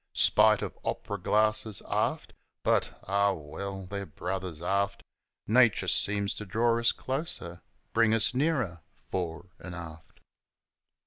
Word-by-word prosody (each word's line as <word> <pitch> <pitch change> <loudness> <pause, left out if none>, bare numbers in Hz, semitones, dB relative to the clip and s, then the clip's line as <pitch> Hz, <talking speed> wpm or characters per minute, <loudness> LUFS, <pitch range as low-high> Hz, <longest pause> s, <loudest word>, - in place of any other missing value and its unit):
Spite - - +5
of - - -5
op'ra 100 - -3
glasses, 110 +2 +1
aft; - - -1 0.3
But, - - +1
ah 100 +1 +2
well, 95 +5 -6
they're 100 +1 -5
brothers 90 +1 -4
aft 100 +2 0 0.4
Nature 115 -1 +4
seems 100 -1 +1
to 105 - -7
draw 115 +4 +2
us 115 - +4
closer 130 - -4 0.3
bring 115 -1 +4
us 115 +2 +3
nearer 130 - 0 0.3
fore 90 -1 -4
'n' 90 -1 -7
aft. 80 -2 -10
100 Hz, 125 wpm, -29 LUFS, 90-110 Hz, 0.4 s, Spite